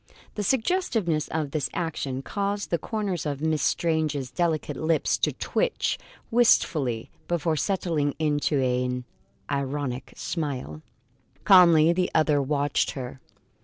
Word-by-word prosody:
The 210 - -3
suggestiveness 220 - 0
of 155 -3 -3
the 155 -2 -2
action 140 -6 -3
caused 200 +3 -2
the 170 - +1
corners 200 -2 -2
of 140 -2 -3
Miss 155 -1 0
Srange's 155 -6 0
delicate 165 -2 -1
lips 155 0 +1
to - - +2
twitch - - -1 0.3
wistfully, 155 - +2 0.2
before 165 -2 0
settling 160 -4 0
into 150 -2 +1
an 125 -1 0 0.5
ironic 140 -2 -3
smile. 135 - -4 0.6
Calmly 170 -4 +7
the 180 +1 0
other 155 -2 +3
watched 145 0 0
her. 130 0 -6
155 Hz, 120 wpm, -26 LUFS, 140-175 Hz, 0.6 s, Calmly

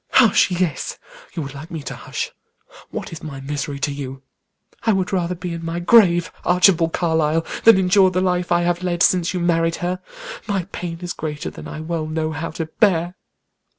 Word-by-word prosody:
"Hush, 230 -6 +5
yes! 180 -3 -1 0.4
You 165 - -2
would 135 -1 -7
like 150 +4 -9
me 160 -4 -6
to - - -5
hush; - - -5 0.6
what - - -6
is 160 - -8
my 140 -3 -7
misery 140 +1 -4
to 145 - 0
you? 135 -1 -6 0.6
I 225 - +2
would 190 +1 -1
rather 180 -1 0
be 175 0 -5
in 165 0 -6
my 165 +1 -3
grave, 175 -3 +5
Archibald 175 -2 +4
Carlyle, 160 -1 +1 0.2
than 225 -3 +9
endure 190 +1 +5
the 185 0 0
life 180 -1 0
I 175 0 +4
have 175 0 0
led 175 -2 +1
since 180 0 +3
you - - 0
married 165 -1 +2
her. 180 +1 -2 0.5
My 200 -4 0
pain 170 -2 -5
is 175 - -3
greater 150 -1 -5
than - - -9
I 155 - -6
well 160 -1 -3
know 155 0 -2
how 165 +1 -4
to 165 - -4
bear." 175 0 +1
170 Hz, 195 wpm, -21 LUFS, 160-180 Hz, 0.6 s, than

